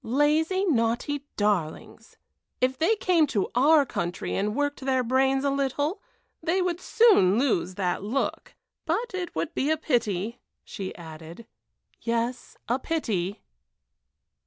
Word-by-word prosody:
"Lazy, 305 - +2
naughty 275 0 0
darlings! 200 -7 -2 0.4
If 255 +1 +1
they 390 +8 +3
came 350 -6 +3
to 215 -8 -1
our 290 +4 +5
country 175 -7 -3
and 210 +2 -1
worked 290 +1 -1
their 260 -1 +1
brains 265 +2 +2
a 280 - +2
little, 280 - -1 0.4
they 335 +4 +1
would 360 -1 -1
soon 405 - +5
lose 185 -8 +1
that 180 -2 -1
look. 230 +7 -3 0.3
But 405 +8 -1
it 370 -2 -4
would 160 +1 -2
be 280 - 0
a 315 - +2
pity," 230 - -1 0.2
she 195 -4 -6
added 165 +5 -10 0.6
"yes, 235 +1 -2
a 245 +4 +1
pity." 215 - -2
260 Hz, 135 wpm, -26 LUFS, 205-310 Hz, 0.6 s, our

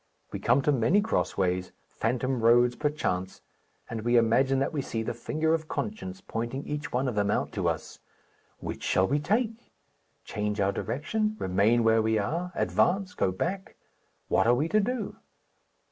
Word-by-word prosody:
We - - -4
come 125 +4 +3
to 150 - +3
many 140 - +3
cross 220 +2 -1
ways, 90 -1 0
phantom 125 +2 -1
roads 120 +2 +5
perchance, 120 -12 -2 0.4
and 115 -1 -4
we 120 +2 +3
imagine 130 +4 +3
that 135 +3 0
we 145 - -1
see 115 -3 -3
the - - -3
finger 155 +7 -1
of 160 -1 -1
conscience 195 -2 -4
pointing 125 -5 -4
each 150 -1 -4
one 130 +2 0
of 125 - -1
them 100 -1 +1
out - - 0
to - - 0
us. - - -5 0.6
Which - - -6
shall 95 +1 +2
we 145 +2 +1
take? 225 - -1 0.5
Change 105 -1 -3
our 100 0 +2
direction, 215 - -2
remain 105 - +2
where 115 0 +4
we 110 0 +1
are, 165 - -2
advance, 185 +1 +1
go 95 - +1
back? 185 - -3 0.5
What - - +2
are 120 - +5
we 145 +6 0
to 215 - +3
do? 220 0 -2
130 Hz, 175 wpm, -28 LUFS, 110-170 Hz, 0.6 s, roads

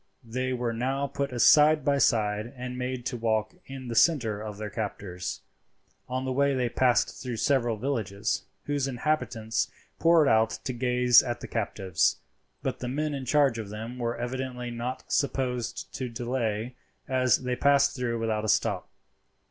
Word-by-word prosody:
They 130 +3 -2
were 120 -2 -1
now 135 +4 -1
put 140 -2 -3
side 150 +3 +6
by 140 -1 +3
side 110 -1 +1
and 125 0 -5
made 125 -1 -4
to 125 - -2
walk 110 -2 0
in 135 -1 -8
the 120 - -3
centre 115 -7 +3
of 105 -2 -6
their 105 -1 -5
captors. 100 -4 -4 0.7
On 130 +1 -2
the 130 - -1
way 140 +1 +2
they 125 -2 0
passed 120 -3 +2
through 125 -3 -4
several 120 -2 +1
villages, 110 -4 -2 0.2
whose 145 -2 -1
inhabitants 125 -4 -1 0.3
poured 165 -3 +5
out 110 -1 +3
to 130 - -3
gaze 125 0 +5
at 120 -2 -4
the - - -7
captives; 95 -6 0 0.5
but - - -2
the 125 - -4
men 150 +4 -1
in 135 -2 -4
charge 140 -4 +3
of 105 -3 -6
them 110 +4 -6
were 120 0 -2
evidently 125 0 -4
not 120 +2 -5
disposed 125 -4 -1
to 130 -2 -4
delay, 120 -1 -2 0.3
as 130 -2 +2
they 125 0 -1
passed 140 +1 +3
through 120 -3 -1
without 110 -1 -1
a 110 - -1
stop. - - +1
125 Hz, 165 wpm, -28 LUFS, 115-130 Hz, 0.7 s, side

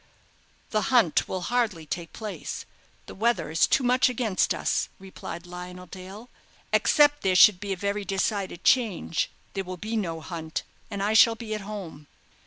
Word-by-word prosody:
"The 215 - +2
hunt 235 - +4
will 185 - -3
hardly 215 -6 0
take 170 0 -5
place; 215 -3 -6 0.4
the - - -10
weather 205 -7 0
is 160 - +4
too - - +2
much 250 +1 +4
against 225 -6 0
us," - - 0
replied 185 -2 -8
Lionel 180 +1 -8
Dale. 190 +5 -10 0.5
"Except 290 -1 +4
there 185 -1 +2
should 180 0 +7
be 200 0 -5
a 190 - -1
very 200 +2 -2
decided 195 -2 -2
change, 220 -10 +2 0.2
there 195 - -2
will 185 0 -7
be 215 +5 -4
no 170 -7 -2
hunt, 160 -1 -5 0.3
and 200 -2 -3
I 210 +2 +1
shall 225 +1 +7
be 225 -1 -6
at 215 - -3
home." 190 -8 -8
195 Hz, 170 wpm, -26 LUFS, 180-220 Hz, 0.5 s, should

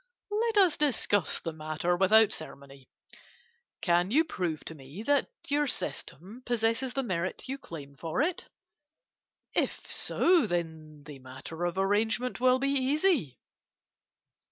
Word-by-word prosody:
Let 445 +1 0
us 370 -6 +5
discuss 215 - +1
the 165 - -5
matter 155 +3 -1
without 210 +4 +5
ceremony. 140 -3 -8 0.9
Can 175 -1 +2
you 300 +9 +4
prove 175 - -3
to - - -6
me 150 +7 -10
that 285 +3 +2 0.2
your 290 +1 +1
system 215 -2 -4
possesses 240 +2 0
the 270 - 0
merit 185 -2 -3
you 270 +1 -4
claim 145 - -9
for 160 - -4
it? 345 +2 -3 1.0
If - - 0
so, 345 -9 +3
then 160 -4 -4
the 145 -2 -10
matter 135 +6 -7
of 175 +1 -2
arrangement 220 +5 +1
will 255 0 +4
be 275 +1 0
easy. 275 - +1
200 Hz, 130 wpm, -29 LUFS, 160-270 Hz, 1.0 s, us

